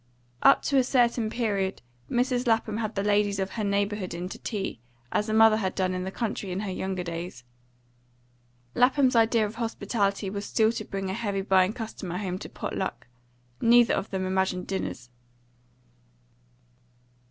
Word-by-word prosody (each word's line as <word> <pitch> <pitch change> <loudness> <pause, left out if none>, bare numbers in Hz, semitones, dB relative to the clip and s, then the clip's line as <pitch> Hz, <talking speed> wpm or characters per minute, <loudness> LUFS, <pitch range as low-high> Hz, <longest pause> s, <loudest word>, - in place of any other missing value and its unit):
Up - - +6
to 280 - +1
a - - +4
certain 240 -3 +2
period 200 - -1 0.3
Mrs. 245 0 0
Lapham 225 -2 +1
had 225 -1 -3
the 200 - 0
ladies 205 -1 +2
of 190 0 -2
her 220 - -3
neighbourhood 200 -2 -1
in 175 +1 -4
to - - -8
tea, 200 - -4 0.3
as 210 - 0
her 215 - -1
mother 220 -1 +6
had 190 -4 -2
done 185 -1 0
in 185 0 -3
the - - -2
country 210 -3 -3
in 185 +2 -2
her 205 -3 -3
younger 185 0 -3
days. 170 -6 -6 1.3
Lapham's 260 0 +3
idea 225 -1 +4
of 210 - -5
hospitality 205 -3 -1
was 200 +1 -4
still 220 +1 +2
to 215 -2 -5
bring 195 -1 -3
a - - -3
heavy 205 -2 -2
buying 190 -1 +4
customer 210 -6 -5
home 185 -2 -3
to - - -8
pot - - -5
luck; 125 -11 -3 0.6
neither 235 0 +6
of 195 - -2
them 190 -1 -2
imagined 190 -1 0
dinners. 190 -9 -4
205 Hz, 170 wpm, -27 LUFS, 190-225 Hz, 1.3 s, Up